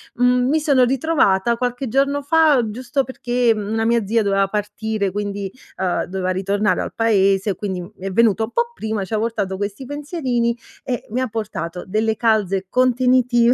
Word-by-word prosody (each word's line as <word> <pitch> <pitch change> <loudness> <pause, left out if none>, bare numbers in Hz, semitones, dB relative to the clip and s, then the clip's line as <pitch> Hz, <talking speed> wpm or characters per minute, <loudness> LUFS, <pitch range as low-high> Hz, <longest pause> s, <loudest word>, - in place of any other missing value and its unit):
mhmm, 250 0 +3
mi 315 +2 +3
sono 280 -4 +3
ritrovata, 240 -6 +2
qualche 245 +1 -2
giorno 275 +4 +1
fa, 305 -3 +4
giusto, 255 +4 -2
perché, 245 -2 0
mhmm, 205 -1 -4
una 225 0 0
mia 230 -2 +2
zia 225 +2 +2
doveva 195 -1 +2
partire, 210 0 -2
quindi, 200 -1 -4 0.3
uhm, 185 -1 0
doveva 185 0 -3
ritornare 200 +3 0
al - - -5
paese, 195 -3 +2
quindi, 190 -3 -4
mhmm, 175 - -9
è 195 +1 -4
venuto 220 +1 +3
un 235 - -13
po' 475 0 0
prima, 220 - -3
ci 205 - -8
ha - - +2
portato 205 -4 -2
questi 205 +6 -4
pensierini, 265 -5 -2 0.3
e 250 -3 -3
mi 250 +4 -1
ha 255 - 0
portato 205 -6 -5
delle 220 +2 0
calze 200 -4 +1
contenitive, 250 -1 +3
225 Hz, 175 wpm, -20 LUFS, 200-250 Hz, 0.3 s, fa